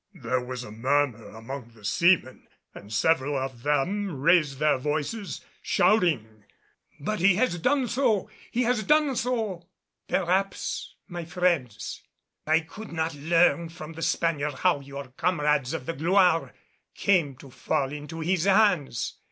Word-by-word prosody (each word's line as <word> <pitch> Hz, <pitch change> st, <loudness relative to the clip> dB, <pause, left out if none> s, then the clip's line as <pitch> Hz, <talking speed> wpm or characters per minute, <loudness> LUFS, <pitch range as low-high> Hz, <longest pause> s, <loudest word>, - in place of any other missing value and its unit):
There 125 Hz, -5 st, -1 dB
was 125 Hz, 0 st, -5 dB
a 105 Hz, -, -9 dB
murmur 125 Hz, 0 st, 0 dB
among 115 Hz, +3 st, -8 dB
the 105 Hz, -2 st, -14 dB
seamen 170 Hz, -, +2 dB, 0.3 s
and 100 Hz, +1 st, -12 dB
several 145 Hz, +5 st, +2 dB
of 130 Hz, -2 st, -4 dB
them 150 Hz, +5 st, 0 dB
raised 155 Hz, -2 st, +3 dB
their 150 Hz, -2 st, +2 dB
voices, 150 Hz, -, -3 dB, 0.2 s
shouting, 125 Hz, -, +1 dB, 0.6 s
"But 215 Hz, +8 st, -2 dB
he 185 Hz, +1 st, +5 dB
has 195 Hz, -5 st, +1 dB
done 260 Hz, -, +2 dB
so! 235 Hz, -5 st, +1 dB, 0.2 s
He 245 Hz, -, 0 dB
has 240 Hz, -2 st, +1 dB
done 300 Hz, +4 st, +3 dB
so!" 220 Hz, -9 st, -2 dB, 0.4 s
"Perhaps, 190 Hz, +1 st, -1 dB
my 175 Hz, -1 st, -6 dB
friends. 160 Hz, -, -1 dB, 0.5 s
I 160 Hz, +1 st, +4 dB
could 200 Hz, +7 st, -10 dB
not 160 Hz, 0 st, -1 dB
learn 165 Hz, +3 st, +2 dB
from 165 Hz, -1 st, -9 dB
the 165 Hz, -, -9 dB
Spaniard 150 Hz, -4 st, 0 dB
how 180 Hz, -2 st, +2 dB
your 140 Hz, -1 st, -8 dB
comrades 150 Hz, -6 st, +1 dB
of 160 Hz, -6 st, -4 dB
the 165 Hz, -, -2 dB
Gloire 175 Hz, +1 st, +2 dB, 0.4 s
came 170 Hz, -9 st, +2 dB
to 135 Hz, +1 st, -14 dB
fall 135 Hz, +1 st, -1 dB
into 150 Hz, +2 st, -7 dB
his 175 Hz, +1 st, +1 dB
hands. 195 Hz, -, +2 dB
160 Hz, 145 wpm, -26 LUFS, 135-185 Hz, 0.6 s, he